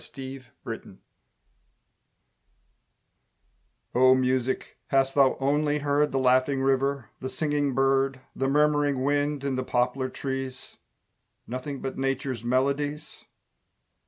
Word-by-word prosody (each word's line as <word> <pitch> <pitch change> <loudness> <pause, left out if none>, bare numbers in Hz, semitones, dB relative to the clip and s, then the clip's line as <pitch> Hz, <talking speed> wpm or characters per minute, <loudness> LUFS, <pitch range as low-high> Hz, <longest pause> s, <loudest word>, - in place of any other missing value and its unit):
STORM 135 -1 -9 0.3
MUSIC - - -11 3.0
O 130 +1 +6
Music 130 0 -1
hast 135 0 +2
thou 135 -2 +4
only 145 +2 +1
heard 145 0 +1
The 135 - 0
laughing 130 +1 +3
river, 135 -1 0
the 130 - -4
singing 145 -2 -1
bird, 135 0 +2 0.2
The 135 - 0
murmuring 145 -1 +2
wind 145 0 0
in 135 -2 -1
the 130 - -1
poplar 125 +1 0
trees, 135 -1 -5 0.7
Nothing 130 +3 -5
but 135 - -4
Nature's 135 -3 -2
melodies? 140 +4 -1
135 Hz, 105 wpm, -26 LUFS, 130-145 Hz, 3.0 s, O